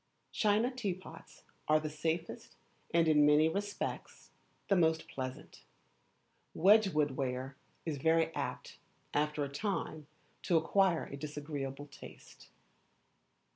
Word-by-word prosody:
China 215 Hz, +4 st, +2 dB
teapots 200 Hz, -8 st, -6 dB, 0.2 s
are 155 Hz, 0 st, +5 dB
the 155 Hz, -, -4 dB
safest, 160 Hz, +2 st, -3 dB, 0.4 s
and, 165 Hz, -1 st, +3 dB
in 150 Hz, -1 st, +5 dB
many 150 Hz, +2 st, +5 dB
respects, 200 Hz, +4 st, -4 dB, 0.4 s
the 195 Hz, -, +3 dB
most 160 Hz, -2 st, +2 dB
pleasant. 130 Hz, -1 st, -7 dB, 0.9 s
Wedgwood 190 Hz, -6 st, +4 dB
ware 130 Hz, 0 st, -3 dB, 0.3 s
is 155 Hz, -4 st, -3 dB
very 160 Hz, +2 st, +2 dB
apt, -, -, -5 dB, 0.3 s
after 150 Hz, 0 st, 0 dB
a -, -, -2 dB
time, 155 Hz, -1 st, -3 dB, 0.3 s
to 170 Hz, -, +2 dB
acquire 175 Hz, +1 st, +2 dB
a 140 Hz, -, -8 dB
disagreeable 145 Hz, -2 st, -5 dB
taste. 145 Hz, -, -14 dB
160 Hz, 110 wpm, -33 LUFS, 145-180 Hz, 0.9 s, are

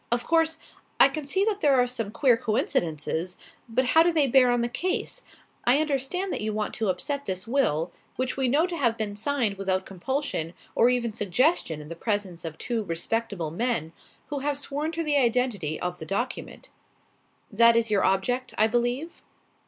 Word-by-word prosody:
"Of 240 Hz, 0 st, +1 dB
course, 325 Hz, +1 st, +2 dB, 0.4 s
I -, -, +8 dB
can 280 Hz, +1 st, -5 dB
see 385 Hz, +6 st, +2 dB
that 425 Hz, -2 st, -1 dB
there 280 Hz, -4 st, +4 dB
are 245 Hz, -, +4 dB
some 230 Hz, -4 st, -2 dB
queer 245 Hz, +3 st, +3 dB
coincidences. 175 Hz, -5 st, -1 dB, 0.3 s
But 255 Hz, +3 st, +1 dB
how 320 Hz, +6 st, +5 dB
do 345 Hz, +1 st, +4 dB
they 310 Hz, -4 st, +3 dB
bear 260 Hz, -1 st, +5 dB
on 245 Hz, -1 st, +2 dB
the 235 Hz, -, +1 dB
case? 355 Hz, +10 st, -2 dB, 0.4 s
I 245 Hz, +3 st, +4 dB
understand 310 Hz, +6 st, -1 dB
that -, -, -3 dB
you 215 Hz, 0 st, -2 dB
want 210 Hz, 0 st, -2 dB
to 220 Hz, -3 st, -1 dB
upset 280 Hz, +10 st, -2 dB
this 185 Hz, 0 st, -2 dB
will; 185 Hz, -, +1 dB, 0.2 s
which 255 Hz, 0 st, -2 dB
we 265 Hz, -1 st, +1 dB
know 290 Hz, +7 st, +3 dB
to 360 Hz, -1 st, -4 dB
have 235 Hz, -7 st, +1 dB
been 210 Hz, -2 st, -3 dB
signed 220 Hz, -3 st, 0 dB
without 190 Hz, -1 st, 0 dB
compulsion 195 Hz, -, -3 dB, 0.2 s
or 235 Hz, -, +4 dB
even 245 Hz, -2 st, +1 dB
suggestion 210 Hz, -, +1 dB
in 150 Hz, -, -10 dB
the 170 Hz, -, -7 dB
presence 195 Hz, -3 st, -2 dB
of 160 Hz, -1 st, -6 dB
two 235 Hz, -2 st, -2 dB
respectable 175 Hz, -1 st, -2 dB
men, 170 Hz, -5 st, -1 dB, 0.4 s
who 290 Hz, -1 st, -3 dB
have 285 Hz, +1 st, -1 dB
sworn 290 Hz, +2 st, -3 dB
to 330 Hz, 0 st, -2 dB
the 295 Hz, -2 st, +1 dB
identity 235 Hz, -, +1 dB
of 180 Hz, 0 st, -4 dB
the 160 Hz, -, -7 dB
document. 240 Hz, +6 st, -4 dB, 0.8 s
That 230 Hz, +2 st, +6 dB
is 230 Hz, -1 st, +1 dB
your 200 Hz, -2 st, +3 dB
object, 245 Hz, +7 st, 0 dB
I 215 Hz, -, +5 dB
believe?" 245 Hz, +8 st, -1 dB
240 Hz, 190 wpm, -26 LUFS, 195-280 Hz, 0.8 s, I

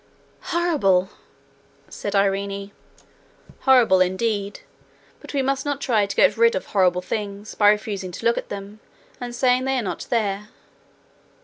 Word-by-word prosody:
'Horrible!' 280 Hz, -, +1 dB, 0.8 s
said 205 Hz, -, -5 dB
Irene. 200 Hz, 0 st, 0 dB, 0.9 s
'Horrible 240 Hz, -8 st, +5 dB
indeed; 200 Hz, +2 st, -1 dB, 0.6 s
but -, -, -11 dB
we 275 Hz, -2 st, 0 dB
must 270 Hz, 0 st, -1 dB
not 285 Hz, -1 st, -2 dB
try 220 Hz, -7 st, +1 dB
to 200 Hz, -, -5 dB
get -, -, +4 dB
rid 465 Hz, +1 st, +4 dB
of -, -, -3 dB
horrible 180 Hz, -2 st, +2 dB
things 205 Hz, +1 st, -5 dB
by 205 Hz, -1 st, +4 dB
refusing 210 Hz, -3 st, -1 dB
to 230 Hz, -, -8 dB
look 235 Hz, 0 st, +3 dB
at -, -, -10 dB
them, 200 Hz, +1 st, -8 dB, 0.4 s
and 245 Hz, -1 st, -6 dB
saying 250 Hz, +1 st, +2 dB
they 265 Hz, 0 st, 0 dB
are 245 Hz, -, -1 dB
not 180 Hz, -4 st, -5 dB
there. 210 Hz, -3 st, -1 dB
210 Hz, 145 wpm, -22 LUFS, 195-250 Hz, 0.9 s, Horrible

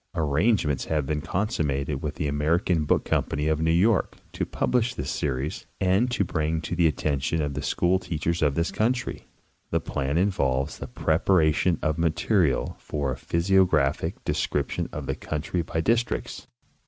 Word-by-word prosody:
Arrangements 80 Hz, -, +1 dB
have 75 Hz, -3 st, 0 dB
been 75 Hz, +2 st, -1 dB
consummated 75 Hz, -, -1 dB
with 75 Hz, -1 st, -3 dB
the 80 Hz, -4 st, -2 dB
Ameri 75 Hz, +4 st, +1 dB
can 80 Hz, -4 st, +1 dB
Book -, -, +2 dB
Company 75 Hz, +2 st, 0 dB
of 80 Hz, 0 st, +1 dB
New 80 Hz, -, +2 dB
York 95 Hz, +5 st, +2 dB, 0.2 s
to -, -, -2 dB
publish 125 Hz, -1 st, 0 dB
this 70 Hz, -, -3 dB
series 70 Hz, +1 st, -3 dB
and 95 Hz, +6 st, +2 dB
to 120 Hz, -4 st, +1 dB
bring 80 Hz, -2 st, -1 dB
it 80 Hz, -, -5 dB
to 80 Hz, -, -3 dB
the 85 Hz, -1 st, +4 dB
attention 75 Hz, 0 st, -1 dB
of 75 Hz, -2 st, -1 dB
the 70 Hz, -, -3 dB
school 90 Hz, +2 st, +1 dB
teachers 85 Hz, 0 st, -2 dB
of 75 Hz, -3 st, +2 dB
this 85 Hz, +2 st, 0 dB
country. 125 Hz, +3 st, -1 dB, 0.4 s
The -, -, +1 dB
plan 70 Hz, +2 st, -2 dB
involves 70 Hz, -9 st, 0 dB
the 65 Hz, -, -6 dB
preparation 80 Hz, +4 st, +2 dB
of 80 Hz, 0 st, 0 dB
material 80 Hz, -, +1 dB
for 70 Hz, -3 st, -3 dB
a -, -, -2 dB
physio 90 Hz, +8 st, +2 dB
graphic 75 Hz, -7 st, 0 dB
description -, -, -1 dB
of -, -, -5 dB
the -, -, -1 dB
country 80 Hz, +3 st, -3 dB
by 80 Hz, 0 st, -2 dB
districts. 115 Hz, +6 st, -1 dB
80 Hz, 170 wpm, -26 LUFS, 75-90 Hz, 0.4 s, the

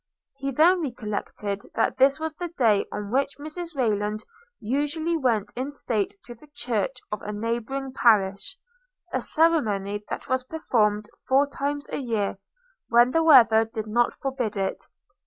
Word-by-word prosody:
He 275 Hz, 0 st, -3 dB
then 335 Hz, +7 st, +4 dB
recollected, 210 Hz, -6 st, -4 dB
that 225 Hz, -, +1 dB
this 275 Hz, +3 st, +5 dB
was 320 Hz, 0 st, -3 dB
the 350 Hz, +3 st, -5 dB
day 230 Hz, -11 st, +2 dB
on 205 Hz, 0 st, -5 dB
which 275 Hz, +2 st, 0 dB
Mrs 315 Hz, +3 st, -7 dB
Rayland 215 Hz, -4 st, 0 dB, 0.4 s
usually 295 Hz, +8 st, -1 dB
went 235 Hz, -9 st, 0 dB
in 260 Hz, +3 st, -3 dB
state 235 Hz, -, -2 dB
to 240 Hz, -, -8 dB
the 240 Hz, +6 st, -18 dB
church 240 Hz, 0 st, -2 dB
of 210 Hz, -, -3 dB
a 210 Hz, -, -5 dB
neighboring 235 Hz, +5 st, -3 dB
parish; 205 Hz, -, +2 dB, 0.6 s
a -, -, 0 dB
ceremony 210 Hz, -11 st, +1 dB
that -, -, -5 dB
was 260 Hz, 0 st, 0 dB
performed 215 Hz, -8 st, 0 dB, 0.2 s
four 270 Hz, +2 st, +4 dB
times 285 Hz, +1 st, -4 dB
a -, -, -2 dB
year, 220 Hz, -7 st, -2 dB, 0.5 s
when 240 Hz, +1 st, +5 dB
the 325 Hz, -, +2 dB
weather 245 Hz, -8 st, +7 dB
did 225 Hz, -1 st, -5 dB
not 235 Hz, +3 st, +1 dB
forbid 255 Hz, -6 st, -3 dB
it. 195 Hz, -1 st, -2 dB
245 Hz, 155 wpm, -25 LUFS, 210-285 Hz, 0.6 s, weather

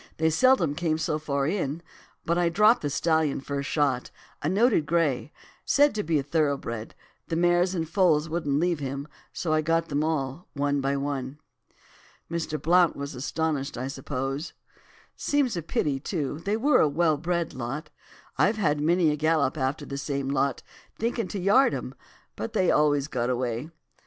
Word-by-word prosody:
They 160 Hz, 0 st, +2 dB
seldom 180 Hz, -, +4 dB
came 155 Hz, 0 st, 0 dB
so 155 Hz, -1 st, -1 dB
far 140 Hz, -2 st, -1 dB
in; 165 Hz, -2 st, -2 dB, 0.4 s
but 170 Hz, -, +1 dB
I 175 Hz, -1 st, +2 dB
dropped 210 Hz, +7 st, +4 dB
the 145 Hz, -, -1 dB
stallion 160 Hz, -1 st, +1 dB
first 140 Hz, 0 st, -4 dB
shot, 140 Hz, -5 st, 0 dB, 0.3 s
a 150 Hz, -, 0 dB
noted 200 Hz, -4 st, +3 dB
grey, 155 Hz, -3 st, +1 dB, 0.3 s
said 290 Hz, +1 st, +4 dB
to 210 Hz, -, -1 dB
be 160 Hz, -3 st, +1 dB
thoroughbred; 140 Hz, -7 st, -2 dB, 0.3 s
the 165 Hz, -, -2 dB
mares 175 Hz, +2 st, +2 dB
and 165 Hz, -2 st, -2 dB
foals 165 Hz, -3 st, +3 dB
wouldn't 155 Hz, -4 st, -1 dB
leave 175 Hz, -1 st, +1 dB
him, 140 Hz, +1 st, -4 dB, 0.2 s
so 160 Hz, -3 st, -2 dB
I 155 Hz, -, +3 dB
got 165 Hz, +1 st, 0 dB
them 145 Hz, +1 st, 0 dB
all, 155 Hz, 0 st, -2 dB
one 145 Hz, 0 st, 0 dB
by 140 Hz, +1 st, 0 dB
one.' 140 Hz, -1 st, -3 dB, 0.9 s
"'Mr. 160 Hz, -2 st, -2 dB
Blount 175 Hz, +3 st, +4 dB
was 140 Hz, +1 st, -5 dB
astonished, 140 Hz, +1 st, -2 dB
I 130 Hz, +2 st, -3 dB
suppose? 135 Hz, +2 st, -4 dB, 0.6 s
Seems 280 Hz, -7 st, 0 dB
a 170 Hz, -, -2 dB
pity, 145 Hz, -3 st, -1 dB
too, 150 Hz, -2 st, -3 dB
they 205 Hz, +2 st, +1 dB
were 285 Hz, +6 st, +4 dB
a 155 Hz, -, +4 dB
well 155 Hz, +1 st, +2 dB
bred 170 Hz, +1 st, -2 dB
lot. 135 Hz, +5 st, -5 dB, 0.5 s
I've 215 Hz, +2 st, +3 dB
had 150 Hz, -8 st, +1 dB
many 165 Hz, +1 st, +3 dB
a -, -, 0 dB
gallop 155 Hz, -2 st, +1 dB
after 135 Hz, -1 st, -2 dB
the 140 Hz, 0 st, -5 dB
same 140 Hz, -1 st, -2 dB
lot, 140 Hz, -1 st, 0 dB, 0.3 s
thinkin' 230 Hz, 0 st, -1 dB
to 200 Hz, -, -4 dB
yard 205 Hz, +9 st, +4 dB
'em, -, -, -5 dB, 0.4 s
but 230 Hz, -, -5 dB
they 190 Hz, -5 st, +3 dB
always 145 Hz, -2 st, +2 dB
got 125 Hz, -4 st, -2 dB
away. 125 Hz, +2 st, -2 dB
155 Hz, 170 wpm, -26 LUFS, 140-175 Hz, 0.9 s, seldom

